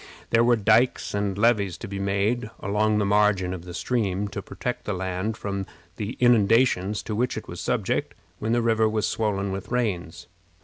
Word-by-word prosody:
There 115 0 +5
were 120 0 +5
dikes 110 +3 +2
and 100 -1 -1
levees 105 -4 +2
to - - -7
be 100 0 -5
made 100 +4 0
along 105 +2 +1
the 105 - +1
margin 100 -3 +2
of 90 -1 -7
the 90 - -8
stream 105 -3 -1
to 100 - -5
protect 125 +5 -5
the 105 - -2
land 95 +4 -3
from 100 -2 -4 0.3
the 105 +2 -3
inundations 115 -3 +3
to 110 - -4
which 125 +3 0
it - - -6
was - - -7
subject - - -1 0.2
when 110 - -2
the 120 0 +2
river 110 -1 +3
was 110 -1 0
swollen 100 -3 -1
with 95 0 -5
rains. 95 -9 -2
105 Hz, 185 wpm, -25 LUFS, 100-115 Hz, 0.3 s, There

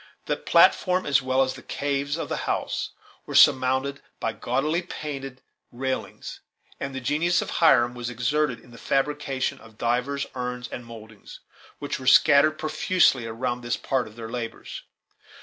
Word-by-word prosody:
The - - 0
platform, 185 0 +3
as 140 -2 +3
well 130 +1 +2
as 130 - -2
the - - -11
caves 140 +1 -2
of - - -4
the - - -3
house, - - -2 0.4
were - - -5
surmounted 130 +2 +4 0.2
by - - -2
gaudily 155 +5 -1
painted 135 -6 -7 0.3
railings, 130 +2 -4 0.4
and 135 -1 -5
the - - -2
genius 155 +7 +1
of - - -7
Hiram 120 -8 +5
was 120 -1 -5
exerted 125 +3 0
in 120 - -19
the 115 - -13
fabrication 135 -1 -1
of 110 -1 -17
divers 125 +4 -1
urns 125 -1 -4
and 120 -1 -8
mouldings, 110 -2 -12 0.4
that 145 +1 -4
were 130 - -8
scattered 155 +3 +6
profusely 155 - +2
around 120 +2 -3
this 120 0 -2
part 130 -4 -1
of 110 - -14
their 115 -1 -7
labors. 115 -2 -6
130 Hz, 160 wpm, -25 LUFS, 120-145 Hz, 0.4 s, scattered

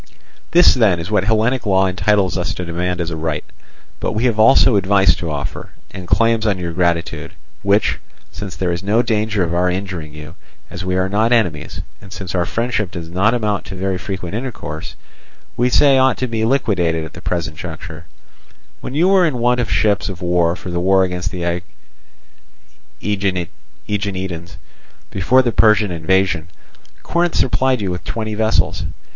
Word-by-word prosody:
"This 175 +2 +6
then 105 -9 +3
is 85 +5 -6
what 105 -2 +2
Hellenic 110 +4 +1
law 95 -2 +3
entitles 95 0 +1
us 90 0 -2
to 90 - -4
demand 90 +1 -2
as 85 -1 -2
a - - -3
right. 80 -1 -3 0.5
But - - -2
we 110 +2 -1
have 115 -4 +1
also 115 +1 +6
advice 95 -1 +4
to 85 - -4
offer 75 -2 -5 0.2
and 90 -1 -8
claims 115 +2 +2
on 100 -3 +1
your 85 -2 -4
gratitude, 85 -1 -1 0.3
which, 100 +2 +2 0.3
since 95 -4 -7
there 90 +1 -1
is 85 0 -3
no 105 +4 +2
danger 110 -3 0
of 85 0 -2
our 90 +1 +2
injuring 90 -4 -4
you, 75 0 -9 0.4
as 85 - -6
we 90 0 -1
are 95 0 +1
not 110 +4 +1
enemies, 85 -11 0 0.2
and 95 - -14
since 95 -2 -6
our 90 -2 0
friendship 115 -4 -1
does 85 -2 -7
not 100 +6 +2
amount 105 -4 -1
to 95 - -7
very 95 0 -2
frequent 95 -2 -5
intercourse, 110 - -5 0.6
we 125 +1 +2
say 135 +1 +5
ought 130 -1 +3
to 130 - -1
be 115 -2 -1
liquidated 90 -11 +1
at 80 - -11
the - - -10
present 85 -3 -3
juncture. 80 -1 -8 0.7
When 130 - -7
you 170 +4 +3
were 190 -2 +5
in 140 -6 -2
want 120 +1 +2
of 115 -5 -1
ships 100 +4 +1
of 95 -2 -6
war 85 -1 +2
for 90 - -8
the 85 - -1
war 95 +1 +4
against 90 0 -2
the 85 -2 -2 1.4
Aeginetans, 95 - -4 0.5
before 120 +8 +3
the 120 - +1
Persian 105 -3 +4
invasion, 85 0 +1 0.6
Corinth 170 0 0
supplied 130 -2 +1
you 95 -2 -1
with 90 - -5
twenty 110 0 -4
vessels. 110 +1 +1
95 Hz, 175 wpm, -18 LUFS, 85-110 Hz, 1.4 s, This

